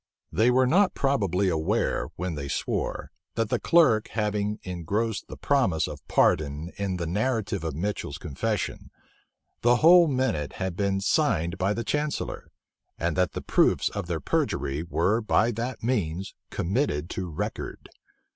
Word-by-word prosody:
They 115 +3 +3
were 130 +1 +4
not 185 +9 +3
probably 100 -9 +1
aware, 80 -3 0
when 90 -1 -3
they 70 -2 -5
swore, - - -2 0.2
that 115 -2 0
the - - +1
clerk 135 -11 +4
having 105 -1 -1
engrossed 100 +5 -2
the - - -9
promise 115 - +1
of - - -8
pardon 75 +3 +1
in 95 -2 -2
the 85 - -3
narrative 105 0 -1
of 80 -3 -3
Mitchel's 85 -4 -3
confession, 95 +7 -3 0.7
the 120 +1 +5
whole 170 +5 +7
minute 130 - -1
had 95 -2 -3
been 100 0 0
signed 85 -2 +1
by 100 +3 +1
the 115 - -2
chancellor, 150 +5 -2 0.5
and 85 -1 -1
that 90 -1 +1
the - - -5
proofs - - +3
of 100 -4 -5
their 85 -2 -2
perjury 70 0 -1
were 85 +6 +1
by 110 +1 +2
that 120 +2 -4
means 95 -6 -1 0.2
committed 85 - -1
to 90 -2 -4
record. 75 - -5
100 Hz, 150 wpm, -26 LUFS, 85-115 Hz, 0.7 s, whole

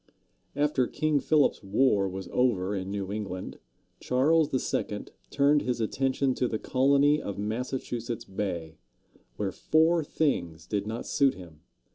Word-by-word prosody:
After 145 -3 +1
King 155 -2 +1
Philip's 150 0 +2
War 100 -1 +2
was 95 -1 -6
over 105 -6 +1
in 95 -1 -4
New 100 -1 -4
England, 100 -3 -5 0.4
Charles 150 +5 +2 0.2
II. 105 0 -2 0.2
turned 145 +1 +3
his 125 -1 -2
attention 130 +3 0
to 125 - 0
the 110 - -2
colony 140 +5 +3
of 100 - -5
Massachusetts 120 +1 -3
Bay, 85 -6 -4 0.6
where 95 +5 -2
four 160 - +2
things 85 - -1
did 105 -1 -2
not 115 +2 -4
suit 140 -2 +2
him. 85 -4 -12
120 Hz, 135 wpm, -28 LUFS, 100-140 Hz, 0.6 s, turned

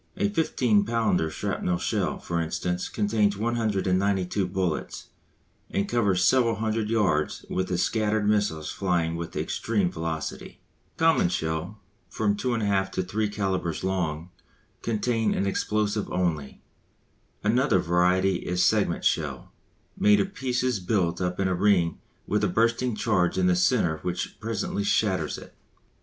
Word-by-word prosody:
A 205 - +1
15 125 - +2
pounder 110 -7 +1
shrapnell 90 +2 -2
shell, - - -1
for 85 -1 -2
instance, 90 +2 -2
contains 105 -1 +1
192 100 -4 0
bullets, 90 -3 -3 0.6
and 100 +1 -1
covers 100 -6 +2
several 120 -2 +3
hundred 110 0 -1
yards 95 -10 0
with 95 0 -1
the 90 - -1
scattered 110 +1 +1
missiles 100 -8 0
flying 85 -4 0
with 85 0 -6
extreme 100 -6 -1
velocity. 80 -2 -5 0.4
Common 160 - +3
shell, 90 +4 -3 0.3
from 105 -2 0
2 115 - -4
1/2 100 -5 +1
to 95 - -1
3 105 +4 -1
calibres 95 -5 -2
long, 90 -3 -2 0.5
contains 115 0 0
an 100 - 0
explosive 105 +1 -1
only. 80 -6 -2 0.8
Another 125 +6 +3
variety 90 +2 +2
is 90 0 0
segment 100 -4 +1
shell, 70 -6 -1 0.4
made 105 0 +4
of 195 - -1
pieces 125 - -1
built 90 -2 0
up 90 0 -2
in 95 - +2
a 95 - +1
ring 90 -3 +2 0.3
with 105 +2 0
a - - +4
bursting 115 +4 +1
charge 95 -6 +1
in 95 - +2
the 90 -1 +4
centre 90 -4 +2
which 90 +2 -4
presently 110 -2 -2
shatters 100 -2 +1
it. - - -12
100 Hz, 140 wpm, -26 LUFS, 90-110 Hz, 0.8 s, made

